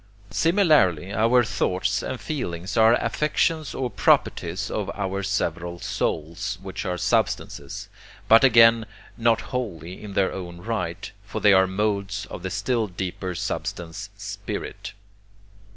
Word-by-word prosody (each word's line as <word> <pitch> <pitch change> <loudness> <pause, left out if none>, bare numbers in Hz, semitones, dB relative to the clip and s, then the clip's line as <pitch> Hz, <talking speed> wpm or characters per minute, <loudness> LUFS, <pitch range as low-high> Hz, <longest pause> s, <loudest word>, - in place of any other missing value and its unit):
Similarly 150 - +3
our 115 +4 +4
thoughts 95 -4 0
and 130 - -4
feelings 95 - -4
are 115 +1 +6
affections 150 +5 0
or 125 -2 -2
properties 95 -1 +1
of 105 -3 -2
our 100 -1 -2
several 90 -3 -2
souls, 85 +5 -2
which 95 +1 -5
are 90 -1 -1
substances, - - -1 0.4
but 115 +3 +7
again 115 -3 +6 0.3
not 115 -1 +2
wholly 95 -8 -4
in 105 -2 -7
their 100 -2 +2
own 85 -2 -7
right, 90 -4 -3
for 100 - -5
they 105 -1 +6
are 95 0 +5
modes 100 0 -1
of - - -6
the 95 - -3
still 115 +3 0
deeper 90 0 -4
substance 85 0 -4
'spirit.' - - -6
100 Hz, 130 wpm, -24 LUFS, 90-115 Hz, 0.4 s, but